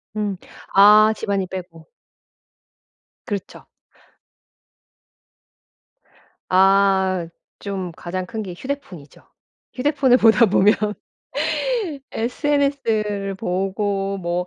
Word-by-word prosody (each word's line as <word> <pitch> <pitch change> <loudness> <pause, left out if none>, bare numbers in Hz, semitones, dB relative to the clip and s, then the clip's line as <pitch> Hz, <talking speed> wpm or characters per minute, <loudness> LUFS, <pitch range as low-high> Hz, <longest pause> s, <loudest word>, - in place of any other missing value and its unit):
음. 210 -2 -2 0.4
아 210 +2 +7
집안일 195 -3 -2
빼고 175 -3 -9 1.4
그렇죠. 200 -4 -6 2.8
아. 190 -1 +3 0.3
좀 190 -3 -5
가장 185 +1 -5
큰 220 +2 -6
게 185 -4 -6
휴대폰이죠. 195 - -8 0.5
휴대폰을 270 -2 +3
보다 225 0 +5
보면 200 +2 +4 1.4
SNS를 230 -6 -1
보고 195 +1 -2
뭐 175 -1 -3
200 Hz, 150 characters per minute, -21 LUFS, 185-220 Hz, 2.8 s, 아